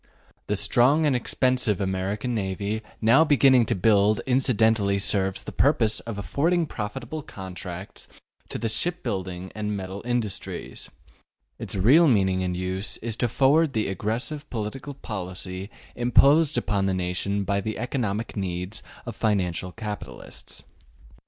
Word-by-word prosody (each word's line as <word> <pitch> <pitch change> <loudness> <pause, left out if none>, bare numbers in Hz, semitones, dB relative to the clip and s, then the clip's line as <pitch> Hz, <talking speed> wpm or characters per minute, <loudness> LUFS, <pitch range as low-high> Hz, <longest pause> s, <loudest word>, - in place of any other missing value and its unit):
The 105 - 0
strong 125 +10 +3
and 145 -3 +3
expensive 125 -3 +1
American 100 +5 -2
navy 100 +1 -2 0.2
now 115 +8 +6
beginning 135 -6 +5
to 115 - +1
be 90 - -8
built 105 0 +4
incidentally 110 -6 +2
serves 95 -1 0
the - - -7
purpose 115 -7 +2
of 115 -3 -7
affording 165 - +1
profitable 120 +5 -5
contracts 95 -4 -8 0.4
to - - -4
the 115 - -2
shipbuilding 95 - -2
and 105 -1 -3
metal 95 +1 -6
industries: 120 -7 -3 0.7
its - - -4
real 135 - +6
meaning 95 -7 +3
and 90 -1 -2
use 95 +2 -3
is 115 -2 -1
to 120 - +1
forward 140 +5 +3
the 110 -3 0
aggressive 120 - -3
political 125 +5 -5
policy 95 -4 -6 0.3
imposed 140 +5 +4
upon 100 -2 0
the 95 - 0
nation 95 +2 -1
by 100 0 0
the 110 +2 -4
economic 115 -3 -2
needs 90 +1 -3 0.2
of 120 - -5
the 110 - -22
financial 95 -5 0
capitalists. 105 0 -8
105 Hz, 140 wpm, -25 LUFS, 95-125 Hz, 0.7 s, now